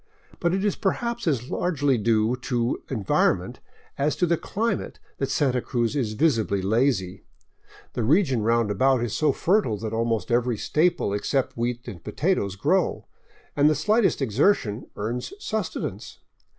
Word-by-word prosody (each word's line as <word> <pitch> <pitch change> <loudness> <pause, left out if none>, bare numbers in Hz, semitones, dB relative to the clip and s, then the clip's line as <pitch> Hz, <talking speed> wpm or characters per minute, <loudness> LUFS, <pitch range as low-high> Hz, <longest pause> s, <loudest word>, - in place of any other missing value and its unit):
But 170 +1 +1
it 195 +2 -1
is 205 - +1
perhaps 235 +3 -2
as 130 -5 -1
largely 145 -6 +1
due 110 +1 +2
to 125 -1 -1
environment 110 -8 0 0.4
as 150 +2 +1
to 180 - +2
the 170 0 +2
climate 225 +7 -3 0.2
that 135 - -1
Santa 130 -4 +1
Cruz 120 +2 -1
is 120 -7 -1
visibly 115 -7 +1
lazy. 100 -2 0 0.7
The - - -2
region 135 - +2
roundabout 115 +3 +2
is 120 - -2
so 155 -2 +3
fertile 165 - +1
that 110 +1 -5
almost 115 -2 -1
every 120 -1 +1
staple 155 - +1
except 130 +6 -1
wheat 120 +1 -3
and 85 -4 -8
potatoes 145 - -1
grow, 95 - 0 0.5
and 145 +1 +5
the 155 - +2
slightest 205 - +2
exertion 120 - +1
earns 120 - -4
sustenance. 220 - -4
125 Hz, 145 wpm, -25 LUFS, 110-155 Hz, 0.7 s, and